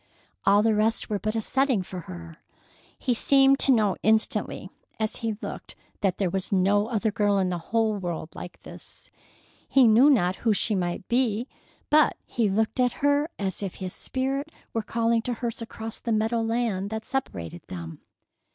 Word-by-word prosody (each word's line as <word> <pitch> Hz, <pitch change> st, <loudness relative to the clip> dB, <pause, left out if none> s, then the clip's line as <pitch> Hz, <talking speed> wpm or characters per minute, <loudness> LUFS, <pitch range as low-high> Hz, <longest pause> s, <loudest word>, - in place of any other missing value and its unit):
All 200 Hz, +1 st, +6 dB
the 225 Hz, 0 st, +3 dB
rest 215 Hz, +1 st, 0 dB
were 205 Hz, -, 0 dB
but 215 Hz, +2 st, -2 dB
a 225 Hz, -, -1 dB
setting 265 Hz, -6 st, +1 dB
for 180 Hz, 0 st, -7 dB
her. 85 Hz, -, -9 dB, 0.6 s
He 250 Hz, -, 0 dB
seemed 270 Hz, +3 st, +4 dB
to 275 Hz, -, +3 dB
know 215 Hz, -6 st, +3 dB
instantly 220 Hz, 0 st, 0 dB, 0.3 s
as 220 Hz, -1 st, -1 dB
he 225 Hz, -2 st, -3 dB
looked -, -, -7 dB, 0.2 s
that 190 Hz, -2 st, 0 dB
there 195 Hz, -, +1 dB
was 190 Hz, -1 st, -2 dB
no 200 Hz, +2 st, +3 dB
other 220 Hz, -2 st, 0 dB
girl 205 Hz, -2 st, +2 dB
in 190 Hz, -1 st, +1 dB
the 175 Hz, -2 st, -3 dB
world 205 Hz, -8 st, -1 dB
like 175 Hz, -, -9 dB
this. -, -, -13 dB, 0.6 s
He 265 Hz, -3 st, +6 dB
knew 235 Hz, +6 st, +6 dB
not 185 Hz, -9 st, +3 dB
who 225 Hz, -2 st, +2 dB
she 215 Hz, +2 st, +1 dB
might 180 Hz, -1 st, -2 dB
be, 240 Hz, -1 st, +1 dB, 0.4 s
but 305 Hz, 0 st, +5 dB
he 230 Hz, -4 st, 0 dB
looked 220 Hz, +6 st, 0 dB
at 250 Hz, -1 st, +3 dB
her 285 Hz, +2 st, +3 dB
as 195 Hz, -1 st, -3 dB
if 195 Hz, -3 st, -4 dB
his 185 Hz, -2 st, -5 dB
spirit 270 Hz, +3 st, -2 dB, 0.2 s
were 225 Hz, -, 0 dB
calling 230 Hz, +1 st, +1 dB
to 245 Hz, +1 st, -3 dB
hers 235 Hz, 0 st, -4 dB
across 225 Hz, -1 st, -7 dB
the 235 Hz, -, -3 dB
meadow 225 Hz, +1 st, +1 dB
land 225 Hz, -4 st, -1 dB
that 220 Hz, 0 st, -5 dB
separated 85 Hz, -, -4 dB
them. 85 Hz, -2 st, -8 dB
220 Hz, 180 wpm, -26 LUFS, 195-235 Hz, 0.6 s, All